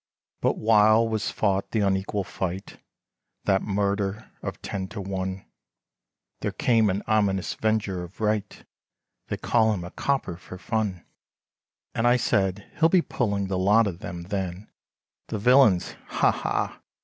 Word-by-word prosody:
But -, -, +1 dB
while 110 Hz, +1 st, +5 dB
was 110 Hz, -1 st, -1 dB
fought 100 Hz, -2 st, 0 dB
the 110 Hz, -, 0 dB
unequal 100 Hz, +1 st, 0 dB
fight, 95 Hz, 0 st, -5 dB, 0.7 s
That 95 Hz, -1 st, +2 dB
murder 100 Hz, 0 st, -1 dB
of -, -, -5 dB
ten 95 Hz, -2 st, -3 dB
to 105 Hz, +2 st, -8 dB
one, 95 Hz, -1 st, -4 dB, 0.9 s
There -, -, -2 dB
came 115 Hz, -4 st, +3 dB
an 95 Hz, +2 st, -1 dB
ominous 100 Hz, -4 st, +1 dB
venger 105 Hz, -5 st, 0 dB
of 90 Hz, +2 st, -12 dB
right, 105 Hz, -1 st, -1 dB, 0.6 s
They -, -, -3 dB
call 110 Hz, -1 st, +2 dB
him 90 Hz, -4 st, -4 dB
a 85 Hz, -, -8 dB
copper 135 Hz, -11 st, -1 dB
for 90 Hz, +1 st, -10 dB
fun, 100 Hz, -1 st, -2 dB, 0.9 s
And 115 Hz, -, +1 dB
I 120 Hz, +1 st, +5 dB
said 95 Hz, -5 st, 0 dB
he'll 165 Hz, 0 st, +5 dB
be 180 Hz, -1 st, +4 dB
pulling 100 Hz, -5 st, -1 dB
the 95 Hz, -1 st, -2 dB
lot 105 Hz, +4 st, +5 dB
of 90 Hz, -4 st, -4 dB
them; 85 Hz, 0 st, -6 dB
then 95 Hz, +1 st, -4 dB, 0.6 s
The -, -, -3 dB
villians 120 Hz, -4 st, +4 dB
ha! -, -, +3 dB
ha! -, -, -2 dB
100 Hz, 150 wpm, -26 LUFS, 95-110 Hz, 0.9 s, while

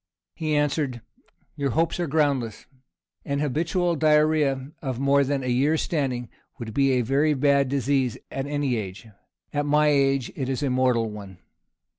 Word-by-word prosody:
He 155 Hz, -2 st, -2 dB
answered, 145 Hz, -4 st, 0 dB, 0.5 s
"Your 140 Hz, -2 st, -1 dB
hopes 165 Hz, +6 st, 0 dB
are 175 Hz, -, -1 dB
groundless. 140 Hz, -7 st, 0 dB, 0.6 s
An 140 Hz, -, -2 dB
habitual 165 Hz, +5 st, 0 dB
diarrhoea 150 Hz, -3 st, +2 dB
of 130 Hz, -4 st, -4 dB
more 140 Hz, +1 st, +3 dB
than 140 Hz, 0 st, -1 dB
a -, -, -4 dB
year's 140 Hz, +6 st, +2 dB
standing, 130 Hz, -6 st, -2 dB, 0.3 s
would 115 Hz, -4 st, -7 dB
be 135 Hz, +1 st, +3 dB
a 125 Hz, -, +2 dB
very 140 Hz, +5 st, +2 dB
bad 140 Hz, -1 st, +2 dB
disease 135 Hz, -2 st, 0 dB
at 135 Hz, +1 st, -3 dB
any 145 Hz, -4 st, -1 dB
age; 95 Hz, -1 st, -6 dB, 0.5 s
at 145 Hz, 0 st, -1 dB
my 150 Hz, +1 st, +4 dB
age 135 Hz, -3 st, +2 dB
it 130 Hz, -2 st, -3 dB
is 135 Hz, +2 st, -2 dB
a 135 Hz, -, 0 dB
mortal 125 Hz, -3 st, +1 dB
one. 100 Hz, -3 st, -10 dB
140 Hz, 160 wpm, -25 LUFS, 130-150 Hz, 0.6 s, my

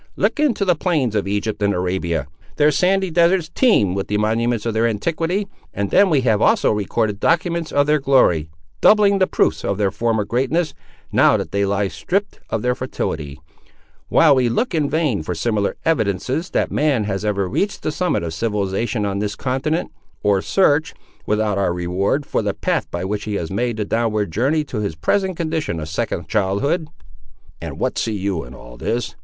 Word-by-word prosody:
"Look -, -, 0 dB
into 245 Hz, -9 st, +2 dB
the 180 Hz, -, +4 dB
plains 155 Hz, -, 0 dB
of 105 Hz, -2 st, -1 dB
Egypt 105 Hz, +1 st, -2 dB
and 100 Hz, 0 st, +2 dB
Arabia; 90 Hz, -4 st, -1 dB, 0.3 s
their 150 Hz, +1 st, +4 dB
sandy 190 Hz, +3 st, +1 dB
deserts 170 Hz, 0 st, +2 dB
teem 105 Hz, -, +3 dB
with 95 Hz, 0 st, -3 dB
the 105 Hz, -, 0 dB
monuments 115 Hz, +1 st, 0 dB
of 115 Hz, -, -1 dB
their 115 Hz, +2 st, +2 dB
antiquity; 165 Hz, -, -1 dB, 0.3 s
and 100 Hz, 0 st, -2 dB
then 195 Hz, 0 st, +5 dB
we 150 Hz, -5 st, +3 dB
have 110 Hz, -4 st, +2 dB
also -, -, +3 dB
recorded 105 Hz, 0 st, -1 dB
documents 170 Hz, +1 st, 0 dB
of 145 Hz, 0 st, +3 dB
their 150 Hz, +1 st, +2 dB
glory; 125 Hz, -, +3 dB, 0.3 s
doubling 205 Hz, -2 st, +5 dB
the 185 Hz, -, +3 dB
proofs -, -, +1 dB
of 100 Hz, -, -1 dB
their 100 Hz, -2 st, +1 dB
former 110 Hz, -1 st, 0 dB
greatness, 135 Hz, -, 0 dB, 0.4 s
now -, -, +4 dB
that -, -, -5 dB
they 100 Hz, 0 st, +1 dB
lie 100 Hz, 0 st, 0 dB
stripped 200 Hz, -, -2 dB
of 110 Hz, -, -2 dB
their 125 Hz, 0 st, +2 dB
fertility; 75 Hz, -, -4 dB, 0.7 s
while 155 Hz, -3 st, +5 dB
we 130 Hz, -3 st, +2 dB
look 225 Hz, -, -1 dB
in 150 Hz, -3 st, +1 dB
vain 150 Hz, -, 0 dB
for 85 Hz, +3 st, -4 dB
similar 105 Hz, +3 st, -1 dB
evidences 130 Hz, -, 0 dB
that -, -, 0 dB
man 145 Hz, -7 st, +1 dB
has 100 Hz, -1 st, -3 dB
ever 100 Hz, -2 st, 0 dB
reached 200 Hz, -, -2 dB
the 155 Hz, -, -1 dB
summit 180 Hz, -, -1 dB
of 80 Hz, -1 st, -4 dB
civilisation 105 Hz, +3 st, -1 dB
on 100 Hz, -1 st, -2 dB
this 105 Hz, 0 st, -2 dB
continent, 135 Hz, +6 st, -2 dB, 0.3 s
or 100 Hz, -2 st, +3 dB
search, 155 Hz, -, +2 dB, 0.3 s
without 105 Hz, -1 st, +1 dB
our 95 Hz, -, +1 dB
reward, 95 Hz, +11 st, -1 dB
for -, -, -1 dB
the 100 Hz, -2 st, -2 dB
path -, -, -1 dB
by -, -, -4 dB
which 100 Hz, +1 st, -3 dB
he 105 Hz, -2 st, -3 dB
has 85 Hz, -3 st, -3 dB
made 120 Hz, +3 st, -1 dB
the 105 Hz, -, -1 dB
downward 110 Hz, -4 st, 0 dB
journey 140 Hz, -, +1 dB
to 125 Hz, -6 st, -5 dB
his 100 Hz, -6 st, -3 dB
present 185 Hz, -, 0 dB
condition 160 Hz, -, -2 dB
of 75 Hz, -, -5 dB
second 80 Hz, -, -3 dB
childhood." 110 Hz, -, 0 dB, 0.7 s
"And -, -, -6 dB
what -, -, -1 dB
see 110 Hz, -2 st, -1 dB
you 95 Hz, -3 st, -2 dB
in -, -, -11 dB
all -, -, -12 dB
this?" 120 Hz, -, -2 dB
115 Hz, 190 wpm, -20 LUFS, 100-155 Hz, 0.7 s, then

